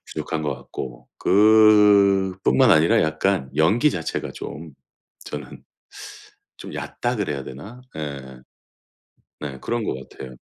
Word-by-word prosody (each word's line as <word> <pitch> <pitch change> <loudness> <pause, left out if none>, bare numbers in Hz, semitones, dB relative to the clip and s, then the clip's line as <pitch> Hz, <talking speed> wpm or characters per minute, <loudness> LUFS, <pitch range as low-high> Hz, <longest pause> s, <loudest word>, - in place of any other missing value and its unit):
부족한 80 -1 -4
것 75 -2 -2
같고. 65 -2 -9
그뿐만 105 +1 +4
아니라 80 -1 +4
약간 80 -1 0
연기 110 - +3
자체가 80 - -4
좀 80 0 -9 0.5
저는 75 -2 -9 0.9
좀 - - -10
얕다 120 +1 -3
그래야 75 -10 -3
되나? 100 - -10 0.2
예. 70 -4 -7 1.0
네. 70 -3 -6
그런 120 0 -2
것 - - -2 0.2
같아요. 65 -2 -11
80 Hz, 215 characters per minute, -22 LUFS, 70-105 Hz, 1.0 s, 그뿐만